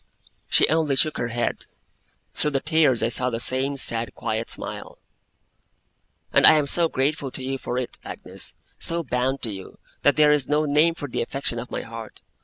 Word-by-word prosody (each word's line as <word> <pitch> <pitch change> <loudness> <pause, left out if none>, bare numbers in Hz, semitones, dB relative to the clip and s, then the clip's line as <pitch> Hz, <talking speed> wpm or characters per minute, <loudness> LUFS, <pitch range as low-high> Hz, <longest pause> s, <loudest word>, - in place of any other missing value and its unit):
She - - +5
only 155 -3 +1
shook 150 +3 +2
her 120 - -1
head; 120 0 -3 0.7
through 150 - 0
her 135 - +2
tears 150 -6 +2
I 115 - +2
saw 125 +2 +2
the 115 -2 -3
same 135 +3 0
sad 115 -3 +1
quiet 110 +1 -3
smile. - - -5 1.4
'And - - +6
I - - +9
am 150 -2 +2
so 165 +4 +2
grateful 140 +1 -1
to 130 - -6
you 135 +1 -3
for 125 - -4
it, 125 -1 -4
Agnes, - - -4 0.2
so 170 0 +1
bound 130 0 -1
to 115 - 0
you, 95 -1 -10 0.2
that 145 - +4
there 150 -1 +5
is 145 -4 +2
no 150 +1 +2
name 150 +3 +3
for 145 - -5
the 125 - -3
affection 120 -1 -3
of 125 - -7
my - - -4
heart. 115 -1 -9
135 Hz, 195 wpm, -24 LUFS, 120-150 Hz, 1.4 s, I